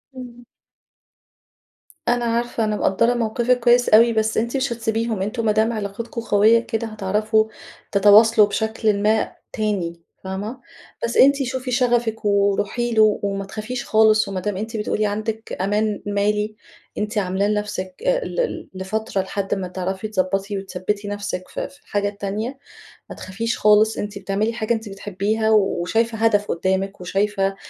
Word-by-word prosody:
إمم. 245 -1 -10 1.6
أنا 240 0 +2
عارفة، 235 0 -1
أنا 215 -1 0
مقدرة 230 +4 +2
موقفِك 240 +1 +1
كويس 245 +1 +4
أوي، 230 +2 +6
بس 220 0 0
أنتِ 235 +4 0
مش 260 -2 0
هتسيبيهم، 225 -2 -2
أنتم 225 +3 -2
ما 215 - +4
دام 220 +2 +2
علاقتكم 215 +3 -5
قوية 220 +1 +4
كده 230 -1 -3
هتعرفوا 215 +1 +1 0.5
تتواصلوا 210 +2 +6
بشكلٍ 220 -1 0
ما 215 +1 +1 0.2
تاني 185 -6 -2 0.2
فاهمة؟ 205 +7 -5 0.4
بس 235 - -1
أنتِ 275 +1 +5
شوفي 255 0 -4
شغفِك 240 -3 +1
وروحي 200 +4 +1
له 215 -1 +4
وما 195 -1 -2
تخافيش 220 +5 -5
خالص، 215 -1 +4
وما 195 -1 -3
دام 190 +1 -3
أنتِ 225 +2 -4
بتقولي 210 0 -1
عندِك 215 +2 -3
أمان 210 +1 0
مالي، 210 +1 0 0.4
أنتِ 210 +1 -3
عاملاه 195 +1 0
لنفسِك 210 - -3
آآ، - - +1
ل - - -6
ل - - -2
لفترة 210 0 -2
لحد 195 +1 -2
ما 185 -2 -4
تعرفي 190 +3 -4
تضبطي 195 0 -1
وتثبّتي 195 +2 -4
نفسِك 200 -3 -4
في - - -5
في 285 +1 -20
الحاجة 205 -5 -1
التانية، 210 +6 -4 0.5
ما - - -7
تخافيش 225 +5 -3
خالص 215 +1 +4
أنتِ 205 0 -4
بتعملي 200 +4 -1
حاجة 230 0 -1
أنتِ 220 -1 -4
بتحبيها 205 +3 -1
وشايفة 220 +2 +1
هدف 210 -2 +2
قدامِك، 190 +2 -1
وشايفة 195 +1 0
215 Hz, 150 wpm, -21 LUFS, 200-230 Hz, 1.6 s, أوي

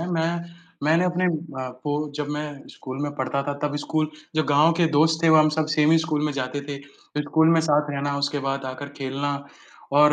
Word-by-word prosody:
है, 170 - -3
मैं 170 +1 -2 0.3
मैंने 165 +4 +4
अपने 180 0 0 0.4
आपको 130 +3 -5 0.2
जब 145 -1 -3
मैं 150 -1 -5
स्कूल 130 0 -8
में 145 0 -3
पढ़ता 140 +1 -1
था, 145 - -2
तब 145 0 -1
स्कूल 155 +1 -1 0.3
जब 155 - +3
गाँव 150 +3 +5
के 165 0 +2
दोस्त 160 +2 +3
थे 165 - +5
वो 160 - +7
हम 155 0 +6
सब 155 0 0
सेम 155 0 +3
ही 165 - +6
स्कूल 155 -1 -1
में 150 - 0
जाते 135 +1 -3
थे। 140 - -3 0.4
फिर 150 - 0
स्कूल 160 +2 +3
में 165 - +4
साथ 150 -2 +2
रहना 140 0 -2
उसके 145 +1 0
बाद 135 0 -2
आकर 130 +2 -6
खेलना 140 +2 -2 0.7
और 150 0 +7
150 Hz, 220 wpm, -24 LUFS, 140-160 Hz, 0.7 s, वो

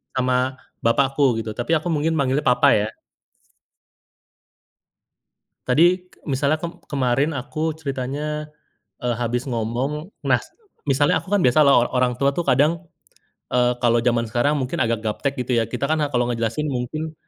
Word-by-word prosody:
sama 125 0 +1 0.5
bapakku 135 +4 +2 0.2
gitu, 110 -1 -4
tapi 120 +7 -2
aku 155 - -5
mungkin 160 +2 0
manggilnya 140 +1 0
papa 125 0 +4
ya. 105 - 0 2.8
Tadi 175 +7 +3
k - - -24
misalnya, 140 +1 +1
kem 170 0 -6
kemarin 135 +2 0
aku 155 +4 -3
ceritanya 150 +1 -4 0.5
e 125 - -4
habis 120 +2 -2
ngomong 130 - -3 0.2
nas, - - +2 0.4
misalnya 145 +1 +2
aku 195 - -12
kan 205 - +3
biasa 150 0 +4
lah 140 -1 +5
o - - +3
orang 125 -1 +2
tua 140 0 +2
tuh 175 - -1
kadang, 160 +5 +2 0.7
eee, 125 0 +3
kalau 120 -1 +4
jaman 120 0 +1
sekarang 120 +7 +1
mungkin 135 +4 -2
agak 115 -2 0
gaptek 140 +6 -2
gitu 125 - -3
ya. - - +1
Kita 140 - -3
kan 160 -1 +2
a 145 - +1
kalau 120 -3 +1
ngejelasin 115 +6 -2
mungkin 155 +6 -3
135 Hz, 155 wpm, -22 LUFS, 125-150 Hz, 2.8 s, lah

